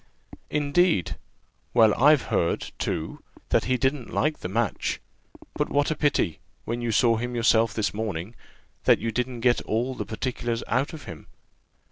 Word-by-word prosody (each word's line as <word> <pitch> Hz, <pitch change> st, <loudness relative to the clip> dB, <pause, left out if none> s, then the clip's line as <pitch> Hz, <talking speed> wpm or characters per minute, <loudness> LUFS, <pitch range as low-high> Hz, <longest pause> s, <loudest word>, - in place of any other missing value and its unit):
"Indeed! 150 Hz, -, +2 dB, 0.6 s
well, 110 Hz, -3 st, +6 dB
I've 145 Hz, +1 st, +5 dB
heard, 85 Hz, -, 0 dB
too, 80 Hz, -, -3 dB, 0.3 s
that -, -, +2 dB
he 130 Hz, 0 st, +1 dB
didn't 130 Hz, -1 st, -1 dB
like 155 Hz, 0 st, 0 dB
the 90 Hz, -, -5 dB
match: 115 Hz, +1 st, -1 dB, 0.5 s
but -, -, -1 dB
what 145 Hz, +2 st, +1 dB
a -, -, 0 dB
pity, 140 Hz, -, +1 dB, 0.3 s
when 120 Hz, +1 st, -3 dB
you 120 Hz, -1 st, -1 dB
saw 115 Hz, +1 st, +3 dB
him 120 Hz, +2 st, -3 dB
yourself 115 Hz, -1 st, +3 dB
this 110 Hz, -2 st, 0 dB
morning, 105 Hz, -2 st, -4 dB, 0.5 s
that -, -, +6 dB
you 115 Hz, +1 st, -3 dB
didn't 125 Hz, +1 st, -3 dB
get 120 Hz, 0 st, +3 dB
all 120 Hz, +4 st, -1 dB
the -, -, -4 dB
particulars 120 Hz, 0 st, -3 dB
out 125 Hz, +7 st, 0 dB
of 155 Hz, -3 st, -8 dB
him. 80 Hz, -, -10 dB
120 Hz, 160 wpm, -25 LUFS, 110-130 Hz, 0.6 s, well